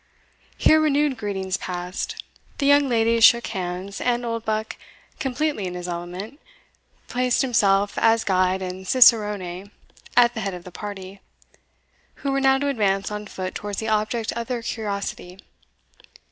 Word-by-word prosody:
Here 315 0 +5
renewed 295 -2 +2
greetings 190 -4 -3
passed: 180 0 -5 0.3
the 280 - -1
young 285 -1 +5
ladies 230 -1 +2
shook 235 +1 +7
hands; 185 +1 -5
and 240 -1 0
Oldbuck, 220 -2 -2 0.4
completely 270 -6 -1
in 180 - -6
his 180 0 -6
element, 180 - -6 0.7
placed 250 +1 +1
himself 205 -5 +2
as 225 0 +3
guide 185 0 +1
and 185 +1 -6
cicerone 205 -6 +3 0.5
at 240 -1 +6
the 220 - -5
head 195 -2 -3
of 175 - -10
the 180 - -11
party, 195 0 -8 1.1
who 275 - +1
were 275 0 0
now 270 0 +4
to 285 +1 -1
advance 200 -7 0
on 210 0 -5
foot 185 -1 -5
towards 205 -1 -5
the 220 - -2
object 215 +1 0
of 235 0 -5
their 245 -2 -3
curiosity. 200 -5 -4
210 Hz, 145 wpm, -23 LUFS, 190-245 Hz, 1.1 s, shook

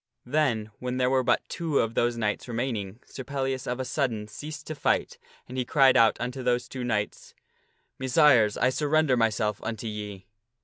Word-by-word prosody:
Then, 120 -6 0
when 125 0 -3
there 125 0 +2
were 130 -1 +3
but - - +1
two 160 -4 -2
of 115 0 +1
those 120 +1 +1
knights 105 0 -2
remaining, 115 -4 -3
Sir 130 - -8
Pellias 135 -1 -3
of 125 +1 -2
a 130 - -2
sudden 115 -4 -1
ceased 150 +8 -8
to 155 - -4
fight, 150 - 0 0.3
and 130 +1 -5
he - - +1
cried 135 0 +4
out 115 -1 +5
unto 125 +2 -4
those 125 -1 0
two 130 -2 -6
knights, 105 -4 -3 0.3
" - - -44
Messires, 130 -6 +4
I 125 - +3
surrender 150 -1 +2
myself 110 -2 0
unto 110 0 -5
ye." 105 -3 -6
125 Hz, 185 wpm, -27 LUFS, 110-135 Hz, 0.3 s, out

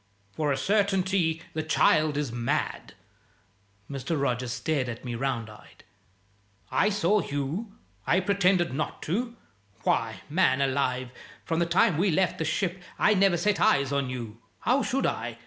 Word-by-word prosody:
"For 150 +6 -1
a 135 - +1
certainty 190 -5 +1
the 155 - -1
child 155 -1 +3
is 145 -5 -1
mad!" 120 0 -2 0.9
Mr. 140 +3 -3
Rogers 125 -2 -1
stared 130 +2 -1
at 115 +1 -7
me 120 - -3
round 120 -2 -2
eyed. 105 -1 -15 0.9
"I 210 - +3
saw 205 0 +2
you? 145 +10 -4 0.3
I 180 - +4
pretended 185 -4 +2
not 155 +3 -3
to? 235 +8 -2 0.5
Why, 110 -4 0
man 145 -4 +2
alive, 130 -2 0 0.3
from 165 0 -1
the 170 - +1
time 175 -1 +3
we 195 +2 +3
left 185 +1 +1
the 160 - -1
ship 180 +3 -1 0.2
I 215 - +4
never 195 -3 +3
set 205 +4 +1
eyes 140 -1 +3
on 140 -2 0
you 115 -3 -6 0.2
(how 260 +3 +2
should 270 +1 0
I?) - - -2
155 Hz, 155 wpm, -27 LUFS, 130-190 Hz, 0.9 s, I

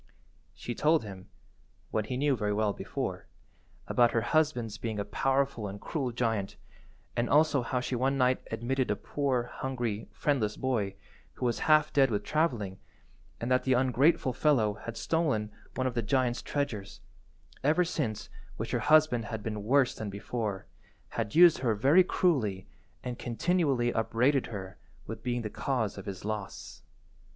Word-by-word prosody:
She 120 - -5
told 155 +3 +3
him 95 -2 -10 0.6
(what 110 -1 -1
he 125 - -2
knew 140 0 +2
very 105 -3 -1
well 105 -1 +1
before) - - -4 0.6
about 120 -1 +3
her 115 - +2
husband's 125 -5 0
being 110 -2 -3
a 100 - -2
powerful 135 -5 0
and 100 +1 -7
cruel 135 -2 -3
giant 115 -5 -1 0.6
and 120 0 0
also 150 -2 +4
how 125 +1 -1
she 125 - -2
one 135 +3 +1
night 130 -1 +2
admitted 125 +4 -1
a 105 - +2
poor, 135 -2 -1
hungry, 120 -3 -4
friendless 110 -2 0
boy, 110 -7 -1 0.4
who - - -4
was 120 - 0
half 155 0 +5
dead 135 -2 +5
with 105 -2 -1
travelling, 120 - -1 0.6
and 120 +2 -3
that 125 - +3
the 130 - +2
ungrateful 130 +3 +3
fellow 120 -6 +2
had 115 +2 -8
stolen 140 -11 0 0.2
one 130 - -1
of 130 - 0
the 120 - 0
giant's 120 +2 +1
treasures, 115 -9 -3 0.6
ever 160 +6 +3
since 135 -11 -3 0.3
which - - -4
her - - +1
husband 155 -7 +4
had 110 -3 -5
been 105 -2 -4
worse 130 +3 +3
than 110 -2 -5
before, 100 0 -4 0.4
had 105 - -3
used 175 0 +7
her 115 -4 +1
very 140 - +5
cruelly, 110 - 0 0.4
and 125 -1 -5
continually 135 -2 +1
upbraided 125 +4 +2
her 95 -3 -7 0.3
with 110 0 -7
being 120 -1 -2
the 105 - -3
cause 120 -6 -1
of 100 - -9
his 100 0 -6
loss. 105 -5 -5
120 Hz, 160 wpm, -30 LUFS, 110-140 Hz, 0.6 s, used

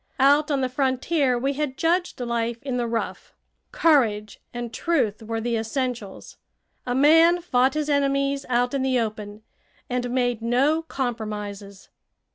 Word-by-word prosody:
Out 285 +3 +4
on 280 -2 0
the 260 - +1
frontier 260 +1 0
we 270 +3 -1
had 280 -2 -3
judged 350 0 0
life 235 -1 -2
in 265 -3 -2
the 240 -1 -1
rough. 230 0 -4 0.4
Courage 220 -10 +2
and 240 -1 -6
truth 265 -12 0
were 225 +1 -4
the 235 +1 -1
essentials. 225 -2 -4 0.5
A 245 - -1
man 325 +5 +5
fought 265 -5 +1
his 305 -1 -1
enemies 275 -1 +1
out 245 +1 +1
in 275 - 0
the 260 -1 +1
open, 215 -1 -5 0.5
and 245 0 -1
made 245 -2 0
no 265 +7 +2
compromises. 210 -8 -5
250 Hz, 145 wpm, -24 LUFS, 230-280 Hz, 0.5 s, man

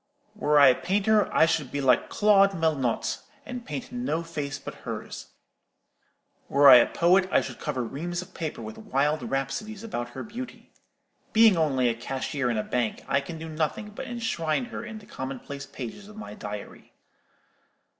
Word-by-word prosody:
Were 150 0 +3
I 140 -2 +9
a 125 - +1
painter, 205 +2 +2
I - - +5
should 160 -5 -1
be 145 - -2
like 130 -2 +3
Claude 200 -2 +4
Melnotte, 155 -8 0 0.3
and 245 -1 -6
paint 250 0 -5
no 245 -9 -2
face 145 -4 -4
but - - -8
hers. - - -6 1.2
Were 140 +1 +6
I 125 - +12
a 120 - +4
poet, 185 +2 +3
I - - +4
should - - -7
cover 135 -5 -2
reams 175 +8 -4
of 185 - -18
paper 155 -8 -5
with 110 0 -8
wild 145 +3 0
rhapsodies 135 - -3
about 120 - -4
her - - -4
beauty. 240 +4 -8 0.6
Being 220 -2 +7
only 140 -6 +2
a 120 - +2
cashier 130 +3 -3
in 115 - 0
a 105 - 0
bank, 120 -3 -2
I 140 - +2
can 165 +4 -7
do 160 0 -7
nothing 160 +8 -2
but 210 - -7
enshrine 225 -7 -1
her - - -7
in 225 -2 -7
the 210 - -13
commonplace 135 - -6
pages 135 - -8
of 215 0 -13
my 215 - -8
diary. 105 -1 -8
155 Hz, 175 wpm, -27 LUFS, 135-205 Hz, 1.2 s, I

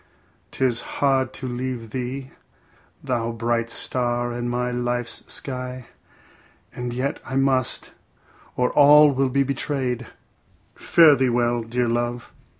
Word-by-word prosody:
'Tis 125 -3 +1
hard 135 -2 0
to 130 - -7
leave 125 -2 -4
thee, 130 +2 -5 0.7
thou 120 -4 -1
bright 115 0 -1
star 120 0 -1
in 120 0 -3
my 125 0 -1
life's 120 -1 -3
sky, 125 -1 -5 0.9
and 125 0 -4
yet 130 +3 -2
I 130 - -6
must, 135 -2 +1 0.6
or 125 0 +1
all 150 0 +7
may 135 +1 +1
be 140 +2 +2
betrayed. 130 -3 -2 0.7
Fare 160 -4 +5
thee 130 -1 +1
well, 120 0 +1
dear 120 +2 -1
love. 120 +1 -2
125 Hz, 125 wpm, -23 LUFS, 120-130 Hz, 0.9 s, all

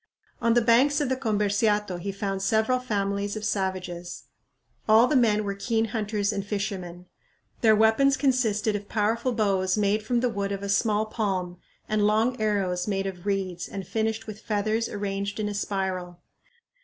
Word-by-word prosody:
On 230 0 +3
the 240 - +4
banks 265 +6 +4
of 290 -3 0
the 260 - +1
Comberciato 210 -4 0
he 200 +3 -3
found 195 -1 -3
several 220 +5 +2
families 200 -3 -2
of 215 -1 -4
savages. 185 -3 -3 0.7
All 220 +2 +7
the 295 - 0
men 215 -4 +3
were 200 -1 -2
keen 225 +2 -1
hunters 210 -2 -1
and 200 -1 -2
fishermen. 195 -4 -4 0.6
Their 220 -2 +6
weapons 225 +6 +4
consisted 225 -6 +1
of 205 0 -6
powerful 225 +4 0
bows 195 -4 +1
made 210 +1 +2
from 235 +2 0
the 250 - +2
wood 200 -3 -3
of 200 0 -4
a 200 - -4
small 210 +1 +2
palm 190 -5 -2 0.3
and 210 -1 +2
long 220 +3 +1
arrows 195 -4 0
made 195 -1 -1
of 190 0 -6
reeds 190 -3 -2
and 195 -1 -6
finished 220 +2 -2
with 215 -1 -8
feathers 215 +2 -1
arranged 200 0 -3
in 210 - -1
a 210 - -3
spiral. 190 -3 -3
210 Hz, 170 wpm, -26 LUFS, 195-220 Hz, 0.7 s, All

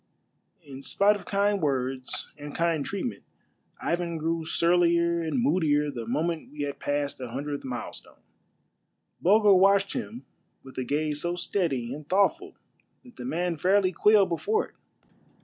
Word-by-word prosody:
But, - - -25
in 135 -1 -9
spite 200 +8 +3
of 205 - -9
kind 200 0 +1
words 130 -3 -2
and 145 -1 -9
kind 165 -3 +1
treatment, 200 - -4 0.6
Ivan 170 -1 -2
grew 165 +1 -1
surlier 170 0 +2
and 165 +9 -1
moodier 150 - +2
the 120 -4 -6
moment 160 +6 -2
we 150 0 -7
had 145 -1 -4
passed 145 -1 -2
the 125 -2 -6
hundredth 140 +4 -4
milestone. 125 -2 -7 1.0
Bulger 205 +2 +5
watched 195 +1 +4
him 240 -1 -6 0.4
with 130 - -13
a - - -1
gaze 150 +2 -1
so 175 0 -1
steady 140 -10 -1
and 150 +1 -10
thoughtful 200 - +1 0.5
that 245 -3 -17
the - - -7
man 180 -8 -1
fairly 185 +3 +3
quailed 205 +1 +4
before 435 - 0
it. - - -30
170 Hz, 150 wpm, -27 LUFS, 145-195 Hz, 1.0 s, Bulger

